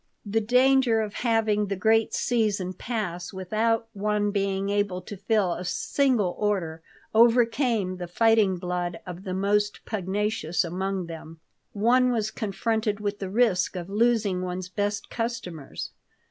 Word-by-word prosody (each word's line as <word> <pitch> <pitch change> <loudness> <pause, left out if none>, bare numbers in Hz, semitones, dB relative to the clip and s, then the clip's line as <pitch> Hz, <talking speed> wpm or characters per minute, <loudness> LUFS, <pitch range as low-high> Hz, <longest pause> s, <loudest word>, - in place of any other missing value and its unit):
The 215 +2 0
danger 250 0 +4
of 210 -1 -4
having 220 -3 +1
the 195 - -2
great 220 +4 +2
season 205 -6 0
pass 180 -5 -4
without 220 +4 0
one 205 0 0
being 195 -1 -1
able 205 -3 0
to 205 - -8
fill 200 -2 +1
a 175 - -5
single 215 0 +1
order 185 -6 -1 0.3
overcame 230 -3 +3
the 175 -1 -5
fighting 215 0 +3
blood 175 -1 -3
of 180 +1 -8
the 185 -1 -3
most 205 +2 0
pugnacious 205 -3 -1
among 185 +2 -2
them. 165 -1 -9 0.3
One 250 +4 +3
was 215 -3 -1
confronted 220 0 -1
with 205 -1 -3
the 195 - -4
risk 200 -5 +2
of 175 0 -5
losing 210 -4 +2
one's 185 0 -4
best 205 +1 -2
customers. 230 - -5
205 Hz, 140 wpm, -26 LUFS, 185-225 Hz, 0.3 s, danger